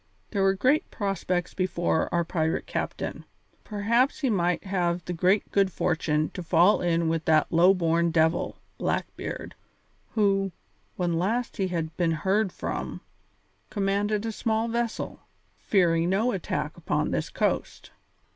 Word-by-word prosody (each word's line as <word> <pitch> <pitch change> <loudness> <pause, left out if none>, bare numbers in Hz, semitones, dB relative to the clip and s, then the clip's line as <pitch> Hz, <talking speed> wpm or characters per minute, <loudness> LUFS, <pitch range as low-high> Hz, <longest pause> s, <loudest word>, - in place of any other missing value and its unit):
There 200 - 0
were 195 0 +3
great 260 +10 +2
prospects 185 -3 -2
before 175 -3 0
our 170 0 +2
pirate 160 -1 -1
captain. - - -4 0.4
Perhaps 235 +8 +1
he 265 -4 +2
might 180 -3 +1
have 175 -3 -1
the 180 - -3
grand 185 +4 +3
good 195 -1 +3
fortune 155 -3 0
to - - -6
fall 175 +4 +4
in 170 -1 +1
with 160 -1 -1
that 155 -1 +3
low 175 +4 +6
born 170 -1 +2
devil, 160 0 +1 0.2
Blackbeard, - - -3 0.6
who, 195 -3 +2 0.4
when 175 -2 0
last 230 +7 -1
he 190 - +1
had 165 -3 -3
been 170 -3 +2
heard 190 +5 +1
from, - - -4 0.7
commanded 205 +1 0
but 225 - -2
a - - -2
small 220 +1 0
vessel, 235 0 -2 0.4
fearing 170 -3 +2
no 215 +6 +2
attack 190 -6 -3
upon - - -1
this - - -1
coast. - - -2
185 Hz, 145 wpm, -27 LUFS, 170-205 Hz, 0.7 s, low